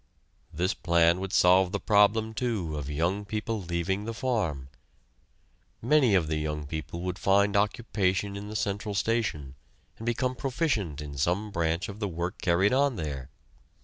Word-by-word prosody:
This 90 +5 0
plan 85 0 +3
would 95 0 -4
solve 90 0 +5
the 100 - -1
problem, 110 +1 +3
too, 110 - -2
of 75 -2 -5
young 85 +7 0
people 110 +1 -3
leaving 90 +3 -2
the 115 0 -4
farm. 100 - -1 1.1
Many 130 -3 +4
of 90 -4 +3
the 80 0 -1
young 75 -1 -3
people 80 +3 -5
would 90 0 -4
find 100 +1 +3
occupation 100 -2 0
in 100 +1 -6
the 110 - -7
central 100 0 -2
station 100 - -1 0.5
and 115 - -7
become 125 +2 0
proficient 120 - -1
in 70 -2 -7
some 95 +8 0
branch 85 +1 -1
of 100 +1 -8
the 105 - -1
work 85 0 -4
carried 95 +3 +3
on 140 -1 +2
there. 70 - -5
95 Hz, 160 wpm, -28 LUFS, 85-110 Hz, 1.1 s, solve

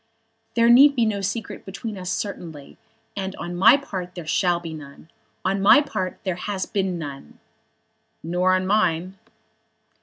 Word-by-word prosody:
"There 230 0 +4
need 275 +4 +7
be 235 -3 +2
no 205 -2 -1
secret 205 +3 -4
between 210 +3 -6
us 180 -2 -6
certainly, 165 -9 -6 0.4
and 190 -1 -4
on 175 +1 -6
my 190 +9 +7
part 185 -10 -7
there 175 -3 -7
shall 175 +2 +1
be 165 -2 -7
none. 150 +1 -12 0.3
On 195 +1 0
my 215 +8 +7
part 190 -11 -3
there 185 - -1
has 195 0 -3
been 190 -3 -2
none." 140 - -8 0.9
"Nor 180 +3 +2
on 185 0 -1
mine." 185 -2 0
185 Hz, 155 wpm, -23 LUFS, 175-205 Hz, 0.9 s, need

